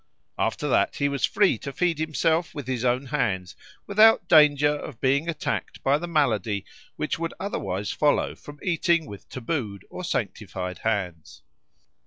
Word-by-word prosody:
After - - 0
that - - +2
he 140 - +1
was 140 -1 +1
free 195 - +2
to 140 - -6
feed 170 +1 0
himself 160 +1 0
with 145 -3 -5
his 125 -2 -2
own 125 +2 +1
hands 105 -10 -1 0.3
without 215 +2 +5
danger 150 -2 +6
of 145 -4 -8
being 140 +5 +1
attacked 160 - -3
by 140 +2 +3
the 175 - -5
malady 115 - 0 0.3
which - - -2
would 165 0 -3
otherwise 100 - -3
follow 150 -1 +1
from 145 0 -13
eating 170 -2 +2
with 100 -7 -11
tabooed 115 - -4
or - - -6
sanctified 90 -1 -3
hands. 95 -7 -3
140 Hz, 155 wpm, -25 LUFS, 110-160 Hz, 0.3 s, danger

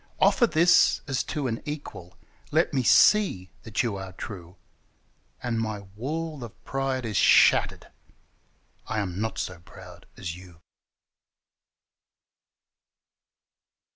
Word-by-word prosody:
Offer 235 - +4
this 170 +1 +4
as 135 -3 0
to 145 -3 -3
an 115 -3 -3
equal 145 - -8 0.2
— - - -31
let - - 0
me 130 - +1
see 125 - +4
that 115 +1 -2
you 110 -5 -2
are 95 -1 -8
true, 90 -3 -9 0.9
And 120 -2 -1
my 110 -2 -4
wall 155 +4 -4
of 115 - -12
pride 135 -2 -2
is 105 -3 -2
shattered: - - +4 1.0
I 110 - -3
am 100 -2 -3
not 110 0 -3
so 90 -2 -4
proud 85 - -14
as 85 -1 -5
you! 90 -2 -14
115 Hz, 120 wpm, -26 LUFS, 95-135 Hz, 1.0 s, Offer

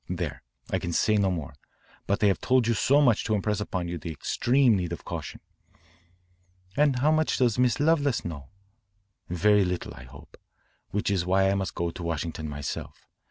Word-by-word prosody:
There, 85 -5 -4 0.3
I - - +1
can 85 - -4
say 110 +5 +2
no 100 -2 +2
more. 80 -7 -4 0.5
But 100 +2 0
I - - +6
have 100 -3 +2
told 130 -2 +3
you 115 - +2
so 140 +6 +3
much 125 -7 +3
to 110 - +1
impress 105 0 -1
upon 90 -4 -3
you 85 0 -4
the 85 - -6
extreme 120 - +2
need 90 -3 -2
of 85 - -8
caution." - - -6 1.3
"And 145 -2 +3
how 145 +5 +3
much 155 0 +1
does 125 -2 +2
Miss 125 +1 +2
Lovelace 145 -4 +2
know?" 75 -5 -7 0.8
"Very 100 +4 +3
little 90 -1 -3
I 65 - -12
hope. 70 +2 -15 0.5
That 105 0 -1
is 95 -3 +1
why 95 +2 +3
I - - +2
must 95 -2 -2
go 85 -1 -1
to 90 - -9
Washington 80 -1 -3
myself. 75 -1 -6
95 Hz, 190 wpm, -27 LUFS, 85-120 Hz, 1.3 s, I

